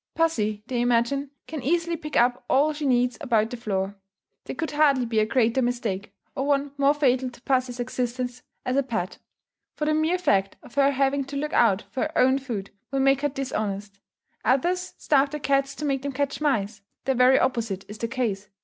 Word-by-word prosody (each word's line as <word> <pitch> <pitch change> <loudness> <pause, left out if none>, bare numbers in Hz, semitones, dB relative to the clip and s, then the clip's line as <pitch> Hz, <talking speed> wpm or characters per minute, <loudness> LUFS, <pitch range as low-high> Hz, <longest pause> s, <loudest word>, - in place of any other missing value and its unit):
Pussy, 215 -11 0
they 245 -1 -1
imagine, 245 +4 +1 0.2
can 310 -3 -6
easily 335 +5 +1
pick 300 -2 -4
up 245 +1 +3
all 295 +3 +3
she 295 -1 -3
needs 245 -1 +2
about 225 -6 +1
the - - -3
floor. 200 -3 -2 0.5
There - - -5
could 320 - -3
hardly 290 -4 +3
be 225 -2 0
a 215 - +2
greater 235 +1 +2
mistake, 235 -5 -2 0.2
or 270 +1 -1
one 285 0 +1
more 280 +1 +3
fatal 260 -3 +2
to 240 -1 -16
pussy's 255 -2 0
existence 245 0 -3 0.2
as 255 - 0
a - - +5
pet. 220 -9 -3 0.6
For 300 - -1
the 310 - +2
mere 315 +3 +2
fact 195 - +1
of - - -14
her 280 0 +4
having 275 0 +1
to 280 +1 -8
look 300 +2 -3
out 210 -4 +4
for 260 - -3
her 315 0 -2
own 260 +1 +4
food 225 -8 -5 0.2
will 275 - -1
make 270 0 +3
her 290 - +1
dishonest. 210 -7 -4 0.4
Others 350 +10 +1
starve 280 -1 +3
their 300 +1 -5
cats 275 -1 +1
to 305 - -4
make 275 -2 0
them 280 0 -4
catch 285 +2 -2
mice; 220 -8 0 0.2
the 270 - +2
very 255 +1 +5
opposite 225 -7 -1
is 210 +1 -9
the 230 - -1
case. 220 -6 -2
260 Hz, 205 wpm, -25 LUFS, 230-280 Hz, 0.6 s, a